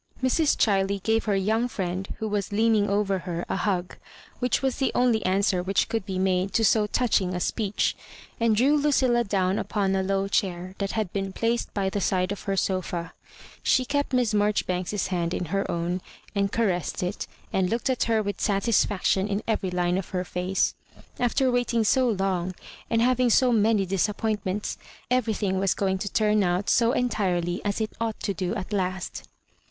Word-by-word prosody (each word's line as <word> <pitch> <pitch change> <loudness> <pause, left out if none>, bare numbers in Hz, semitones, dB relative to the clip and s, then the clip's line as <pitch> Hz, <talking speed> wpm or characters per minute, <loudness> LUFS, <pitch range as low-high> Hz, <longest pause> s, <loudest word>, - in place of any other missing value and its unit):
Mrs. 285 +4 +2
Ohiley 195 -2 +1
gave 225 0 +1
her 205 -2 +1
young 220 +5 +1
friend, 190 -4 -4
who 220 - -3
was 205 -2 -2
leaning 215 0 +2
over 200 -1 +1
her, 175 -1 -4
a - - -2
hug, 180 -3 -1 0.4
which 250 +1 0
was 265 -2 0
the 270 - +1
only 240 -4 +2
answer 190 0 +2
which 190 +2 +1
could 225 -3 -2
be 190 -1 -3
made 185 0 +1
to 225 - +3
so 210 +1 +3
touching 205 -6 +1
a - - -1
speech, 205 +2 0 0.4
and 230 -2 +3
drew 265 +7 +4
Ludlla 260 -5 +3
down 195 -2 0
upon 195 -3 0
a 190 - +1
low 195 +1 0
chair 185 -2 -1
that 200 -1 -2
had 215 -5 -2
been 195 -1 -2
placed 230 +4 -1
by 195 -2 0
the 200 +1 -2
side 185 0 +1
of 205 - -4
her 195 -1 -1
sofa. 180 -3 -2 0.5
She 255 - +2
kept 285 +1 -1
Miss 250 -4 +1
Marjoribanks's 205 -2 0
hand 175 -2 -1
in 180 - -2
her 195 - 0
own, 175 +2 -2 0.3
and 200 -1 0
caressed 185 -8 -1
it, 180 +3 -3 0.3
and 185 -1 +1
looked 230 +5 -1
at 260 -2 +1
her 225 -2 +1
with 200 -2 -4
satisfaction 200 -2 +1
in 205 +1 -2
every 215 -4 0
line 180 0 0
of 195 - -7
her 180 -1 -2
face. 180 +2 0 0.5
After 250 +2 +2
waiting 245 -2 +1
so 255 +3 +3
long, 185 -3 -1 0.3
and 230 0 +2
having 255 0 +3
so 250 +2 +4
many 215 -2 +3
disap 195 +2 0
pointments, 210 -2 -2 0.3
everthing 215 -6 +1
was 195 0 +1
going 190 -1 0
to 200 0 -4
turn 215 -1 +2
out 180 +1 +1
so 235 -1 +4
entirely 180 -8 0
as 205 +1 -1
it 220 -1 -2
ought 225 -1 -2
to 200 - -1
do 185 +2 -2
at 210 0 -5
last. 185 -2 -3
200 Hz, 190 wpm, -26 LUFS, 185-225 Hz, 0.5 s, drew